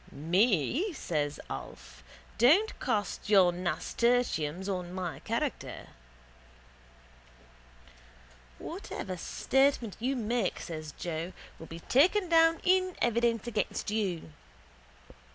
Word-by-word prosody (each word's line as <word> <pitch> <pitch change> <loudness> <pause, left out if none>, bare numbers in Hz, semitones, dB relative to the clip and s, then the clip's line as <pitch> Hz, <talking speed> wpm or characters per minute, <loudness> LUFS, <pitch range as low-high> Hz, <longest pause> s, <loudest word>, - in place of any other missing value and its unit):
—Me? 190 - +1
says 150 - -2
Alf. 65 -2 -9 0.4
Don't 330 - +4
cast 210 -4 -2
your 190 -4 +6
nasturtiums 180 -1 0
on 180 -3 -3
my 180 -3 -4
character. - - -4 2.7
—Whatever 185 - -6
statement 265 +4 +1
you 260 +4 0
make, 235 0 -1
says 155 -2 -6
Joe, 170 +1 -4 0.3
will 165 - -9
be 165 +1 -9
taken 355 - +3
down 330 0 +5
in 370 0 +2
evidence 235 -2 +1
against 215 -3 -2
you. 190 -7 -2
210 Hz, 95 wpm, -30 LUFS, 170-250 Hz, 2.7 s, your